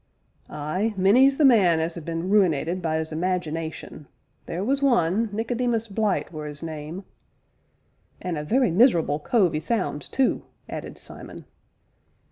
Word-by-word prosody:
"Ay 185 +9 -2
many's 250 +9 +5
the 305 - +4
man 190 -10 +5
as 165 +1 -2
'as 170 - -7
been 165 +2 -3
ruinated 180 -3 +2
by 160 -2 0
'is 160 0 -3
imagination 160 -3 -3 0.4
theer 175 +3 -3
was 275 +5 0
one, 225 -5 +2
Nicodemus 230 +1 -1
Blyte 210 -2 -1
were 155 -1 -6
'is 150 +1 -8
name 160 +3 -6 0.6
" - - -43 0.3
"And 180 -2 -3
a 150 - -3
very 245 - +2
miserable 170 - +3
cove 185 +1 +2
'e 155 - 0
sounds, 160 -6 -2
too!" 265 -2 +1 0.3
added - - -7
Simon. - - -10
180 Hz, 145 wpm, -24 LUFS, 160-225 Hz, 0.6 s, many's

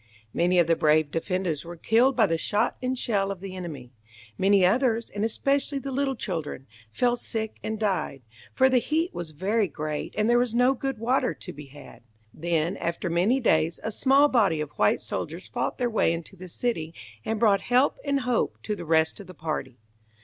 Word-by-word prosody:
Many 180 +1 +2
of 175 - +5
the 165 +1 +3
brave 155 -1 +3
defenders 175 -3 -2
were 170 +1 -8
killed 235 +9 +3
by 225 - +5
the 165 - 0
shot 210 +6 0
and 255 0 -1
shell 200 -5 0
of 195 -2 -4
the 190 0 -7
enemy. 145 -9 -7 0.4
Many 195 - +4
others, 230 +3 +1
and 205 - -3
especially 275 +5 0
the 275 0 -5
little 270 0 0
children, 160 - -4 0.2
fell 240 - +1
sick 220 -2 -4
and 220 0 -3
died, 185 - -1 0.3
for 260 - +4
the 260 -1 +4
heat 320 +7 -1
was 175 -2 -5
very 195 +7 0
great, 150 0 -5
and 215 0 +2
there 240 +1 +4
was 245 -2 0
no 250 +2 +4
good 270 -1 -3
water 250 +3 +1
to - - -9
be 145 0 -10
had. 145 +1 -14 0.3
Then, 170 +2 -1
after 170 +1 -3
many 195 +10 +2
days, 165 -8 +2
a 220 - -2
small 275 +6 +4
body 205 - +2
of 150 -1 -4
white - - +2
soldiers - - -5
fought - - -3
their 245 - 0
way 220 -7 +2
into 170 +3 -7
the 185 0 -10
city, 165 -5 -3 0.3
and 220 -1 -2
brought 210 -3 +4
help 250 +3 +2
and 280 -1 0
hope 250 -2 0
to 210 - -2
the 175 - -8
rest 160 +2 +2
of 200 - -10
the 185 - -11
party. 150 -5 -4
200 Hz, 200 wpm, -26 LUFS, 165-245 Hz, 0.4 s, of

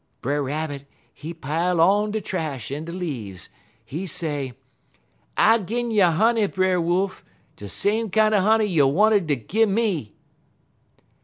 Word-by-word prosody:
"Brer 145 +3 -1
Rabbit 145 0 -4 0.3
he 160 - -8
pile 165 +3 -1
on 205 +5 +4
de 215 +1 -2
trash 155 - -4
en 150 +3 -4
de 170 - -7
leaves. 120 - -6 0.4
He 160 +11 -5
say: 150 -7 -3 0.8
"'I'll 225 -1 +4
gin 235 +4 -2
you 210 -4 +4
honey, 215 +6 +2
Brer 185 -2 +1
Wolf; 185 +3 -1 0.3
de 100 - -9
same 215 - 0
kinder 215 +1 +3
honey 220 +2 +3
you 165 -9 +3
wanted 200 +4 +3
ter 145 - +2
gimme.' 195 - 0
180 Hz, 140 wpm, -23 LUFS, 145-210 Hz, 0.8 s, on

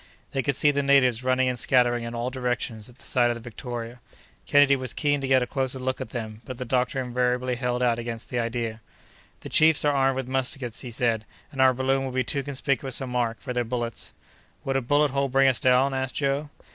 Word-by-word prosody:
They 135 -2 0
could 140 0 -1
see 145 - +4
the 140 0 0
natives 130 -4 +3
running 130 0 +2
and 125 -1 -1
scattering 120 -2 +2
in 115 0 -6
all 120 +2 -2
directions 125 -3 -3
at 125 - -18
the - - -14
sight 120 -1 +2
of 120 - -1
the - - -7
Victoria. 120 0 -7 0.5
Kennedy 145 -1 +5
was 130 -3 -4
keen 145 -2 +1
to 135 - -2
get 130 -1 +4
a - - -1
closer 130 0 -2
look 130 0 -3
at - - -5
them, 110 -2 -6
but 130 - -8
the 125 - -5
doctor 125 +2 0
invariably 125 0 0
held 125 0 -1
out 120 -1 +2
against 115 -1 -6
the 125 - -1
idea. 115 -1 -3 0.6
"The - - -8
chiefs 155 -1 +5
are 145 - +3
armed 135 -1 +2
with 130 -1 -3
muskets," 130 -2 -1
he 125 - -6
said, 115 -2 0 0.3
"and 135 - -2
our 130 0 +6
balloon 135 +1 0
would 130 -1 -5
be 130 - +2
too 140 +1 -1
conspicuous 135 -1 -2
a 135 - -4
mark 120 -2 -1
for 125 - -5
their 125 0 0
bullets." 120 -1 -4 0.5
"Would 135 - -2
a 135 - +2
bullet 145 +3 +2
hole 140 0 0
bring 135 +1 +4
us 130 -2 +2
down?" 130 +2 +3
asked 130 -1 -3
Joe. 140 +1 -1
130 Hz, 235 wpm, -25 LUFS, 120-135 Hz, 0.6 s, our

